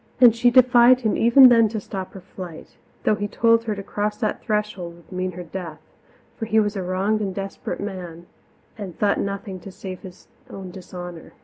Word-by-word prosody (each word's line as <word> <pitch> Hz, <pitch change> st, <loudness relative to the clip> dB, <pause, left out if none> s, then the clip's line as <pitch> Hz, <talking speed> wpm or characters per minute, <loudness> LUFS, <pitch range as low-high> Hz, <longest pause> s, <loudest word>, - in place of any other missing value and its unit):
And 240 Hz, -3 st, +7 dB
she 245 Hz, +1 st, +4 dB
defied 250 Hz, 0 st, +6 dB
him 220 Hz, -3 st, 0 dB
even 250 Hz, +3 st, +7 dB
then 230 Hz, -2 st, +5 dB
to 220 Hz, 0 st, -3 dB
stop 190 Hz, -2 st, -7 dB
her 190 Hz, -, -10 dB
flight, 180 Hz, -3 st, -10 dB, 0.3 s
though -, -, +3 dB
he 205 Hz, 0 st, -2 dB
told 230 Hz, +2 st, +2 dB
her 215 Hz, -2 st, -2 dB
to 200 Hz, -, -7 dB
cross 210 Hz, +1 st, -3 dB
that 215 Hz, -3 st, -2 dB
threshold 210 Hz, -5 st, -3 dB
would 170 Hz, +2 st, -21 dB
mean 185 Hz, 0 st, -3 dB
her 180 Hz, +1 st, -7 dB
death; 170 Hz, -2 st, -7 dB, 0.6 s
for 225 Hz, -, -3 dB
he 220 Hz, 0 st, +2 dB
was 205 Hz, -1 st, 0 dB
a 195 Hz, -, -2 dB
wronged 190 Hz, +4 st, 0 dB
and 195 Hz, -3 st, -3 dB
desperate 195 Hz, 0 st, -5 dB
man 180 Hz, -4 st, -7 dB, 0.5 s
and 190 Hz, -5 st, -7 dB
thought 205 Hz, -1 st, +1 dB
of -, -, 0 dB
nothing 200 Hz, -2 st, -5 dB
save 185 Hz, -1 st, -8 dB
his 185 Hz, -1 st, -13 dB, 0.2 s
own 190 Hz, -2 st, -8 dB
dishonour. 175 Hz, -2 st, -9 dB
200 Hz, 200 wpm, -23 LUFS, 185-220 Hz, 0.6 s, And